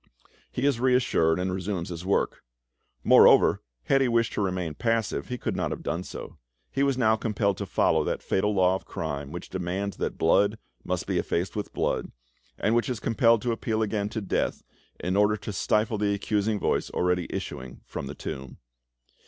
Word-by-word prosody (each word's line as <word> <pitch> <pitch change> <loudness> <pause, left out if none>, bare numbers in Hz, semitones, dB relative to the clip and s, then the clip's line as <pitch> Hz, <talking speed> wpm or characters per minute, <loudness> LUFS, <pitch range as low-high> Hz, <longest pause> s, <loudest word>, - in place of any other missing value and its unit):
He 125 - -2
is 140 -5 +2
reassured, 125 -11 +3
and 90 0 -1
resumes 95 -2 -3
his 85 0 -6
work. 95 +2 0 0.6
Moreover, - - +6 0.2
had 135 - +3
he 130 - +3
wished 115 -1 +1
to - - -1
remain 90 -4 -1
passive, 115 +5 -1
he 125 - -4
could - - -3
not - - -1
have - - -5
done 85 - -2
so; - - -9 0.3
he 135 - -1
was 140 -2 +2
now 110 -3 +4
compelled 105 -3 0
to - - -4
follow - - +2
that - - -2
fatal 105 +2 +1
law 95 -2 +3
of 95 - -3
crime 70 0 -4
which 85 +1 -7
demands 95 +2 -3
that - - -3
blood 100 +6 +3 0.3
must - - -2
be - - 0
effaced 90 +3 -2
with 105 - -4
blood, - - -1 0.5
and 110 - +1
which 120 +1 +2
is 125 -4 -2
compelled 115 +1 +3
to 120 - +1
appeal 110 -1 -1
again 105 -1 -1
to 110 - -4
death 100 - -1 0.4
in 90 +2 -1
order 105 +1 +3
to 100 0 -6
stifle 105 +2 +1
the 100 -1 +1
accusing 105 +1 0
voice - - 0
already 90 -1 0
issuing 65 0 -6
from 70 - -6
the 70 - -7
tomb. 65 -2 -7
100 Hz, 190 wpm, -27 LUFS, 90-115 Hz, 0.6 s, Moreover